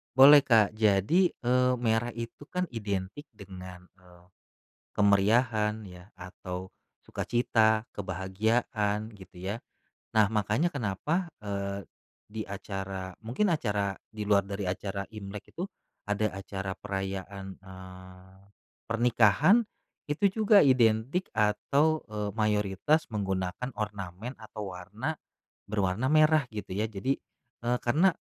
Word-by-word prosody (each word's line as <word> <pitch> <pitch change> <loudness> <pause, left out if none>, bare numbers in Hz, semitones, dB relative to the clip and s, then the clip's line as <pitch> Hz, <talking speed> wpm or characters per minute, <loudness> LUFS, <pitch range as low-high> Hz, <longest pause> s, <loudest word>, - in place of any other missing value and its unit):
Boleh, 140 +2 +9
Kak, 110 -3 +4
jadi, 110 - +3
eee, 125 0 +2
merah 115 0 +1
itu 115 +5 -7
kan 180 -1 -1
identik 105 +3 -4
dengan, 90 -2 -11
eee, 90 -1 -20 0.7
kemeriahan 105 +2 +3
ya, 90 +2 -14
atau 90 0 -7 0.3
sukacita, 110 -2 +1
kebahagiaan, 105 +3 -1
gitu 95 -1 -15
ya. 100 +4 -3 0.6
Nah 110 - +7
makanya 110 - +1
kenapa, 145 - -1
eee, 100 -1 -4 0.4
di 110 +1 -6
acara, 95 -2 -5
mungkin 170 - +1
acara 100 -9 0 0.2
di 105 -1 -6
luar 100 -1 +4
dari 100 0 -5
acara 100 +1 -3
Imlek 100 -1 -8
itu, 180 +4 -4 0.4
ada 105 +1 +1
acara 95 0 -5
perayaan, 95 -1 -5 0.2
eee, 95 0 -13 0.5
pernikahan, 120 - +4 0.5
itu 150 +7 +1 0.2
juga 205 -6 +7
identik 125 +6 +3
atau, 140 +9 +2
eee, 105 -2 -3
mayoritas 105 - +1
menggunakan 95 +3 -2
ornamen 105 +2 -5
atau 105 -3 -7
warna, 105 - -4 0.5
berwarna 105 +6 0
merah 155 -1 +5
gitu 100 -3 -5
ya, 105 - +1
jadi, 110 +5 -1 0.5
eee, 125 +1 +1
karena, 165 +10 +3
105 Hz, 115 wpm, -29 LUFS, 95-120 Hz, 0.7 s, Boleh